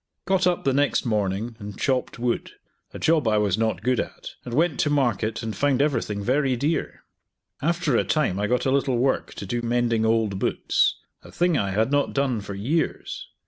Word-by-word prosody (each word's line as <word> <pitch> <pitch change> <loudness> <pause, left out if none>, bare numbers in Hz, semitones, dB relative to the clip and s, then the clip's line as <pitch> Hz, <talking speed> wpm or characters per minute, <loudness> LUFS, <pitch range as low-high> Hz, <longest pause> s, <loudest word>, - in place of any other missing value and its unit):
Got 190 -1 +2
up 175 -1 0
the 135 - +2
next 145 0 +1
morning 105 +1 -1
and 100 -2 -8
chopped 130 -2 0
wood; 120 0 -2 0.4
a - - -8
job 155 -6 +2
I 110 -1 +3
was 105 -3 +2
not 110 0 -1
good 125 -1 +1
at, - - -5
and 120 -1 -5
went 160 -1 +2
to 150 - +2
market, 115 -7 0
and 110 -1 -4
found 140 -3 +1
everything 115 -8 0
very 130 +2 +1
dear. 145 +6 -2 0.6
After 170 -3 +1
a 100 - +3
time 100 -1 0
I 105 - 0
got 125 +2 0
a 130 - +2
little 135 -2 +1
work 130 +2 0
to - - -6
do 120 +5 -2
mending 120 -1 +1
old 110 -3 +1
boots; - - +1 0.3
a - - -14
thing 175 -1 +1
I 100 -8 0
had 110 +6 +1
not 145 -1 +1
done 135 -5 0
for 100 0 -7
years. 140 +12 -2
120 Hz, 200 wpm, -24 LUFS, 110-145 Hz, 0.6 s, I